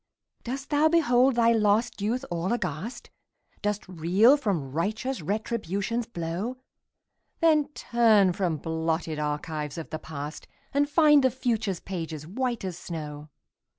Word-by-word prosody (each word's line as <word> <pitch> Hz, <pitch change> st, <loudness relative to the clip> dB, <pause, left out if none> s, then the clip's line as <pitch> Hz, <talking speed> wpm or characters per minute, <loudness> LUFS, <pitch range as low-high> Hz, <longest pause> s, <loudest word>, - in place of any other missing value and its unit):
Dost 270 Hz, +4 st, -5 dB
thou 295 Hz, +1 st, +4 dB
behold 265 Hz, -6 st, +4 dB
thy 235 Hz, -1 st, +4 dB
lost 220 Hz, 0 st, +2 dB
youth 240 Hz, +6 st, -1 dB
all 175 Hz, +3 st, -1 dB
aghast? 205 Hz, -, -4 dB, 0.5 s
Dost 210 Hz, -1 st, -2 dB
reel 185 Hz, -, +4 dB
from 185 Hz, -, -2 dB
righteous 215 Hz, -, -2 dB
Retribution's 215 Hz, +3 st, -2 dB
blow? 180 Hz, +6 st, -4 dB, 0.8 s
Then 310 Hz, -4 st, +4 dB
turn 220 Hz, -6 st, +4 dB
from 175 Hz, -4 st, -1 dB
blotted 160 Hz, 0 st, -2 dB
archives 150 Hz, 0 st, -3 dB
of 165 Hz, -, -7 dB
the 155 Hz, -, -3 dB
past, 150 Hz, -1 st, -7 dB, 0.3 s
And 285 Hz, +1 st, +2 dB
find 295 Hz, -2 st, +5 dB
the 260 Hz, -, +5 dB
future's 225 Hz, -7 st, -1 dB
pages 165 Hz, -5 st, -5 dB
white 235 Hz, +4 st, -2 dB
as 180 Hz, -2 st, -5 dB
snow. 150 Hz, -3 st, -7 dB
205 Hz, 130 wpm, -27 LUFS, 165-245 Hz, 0.8 s, find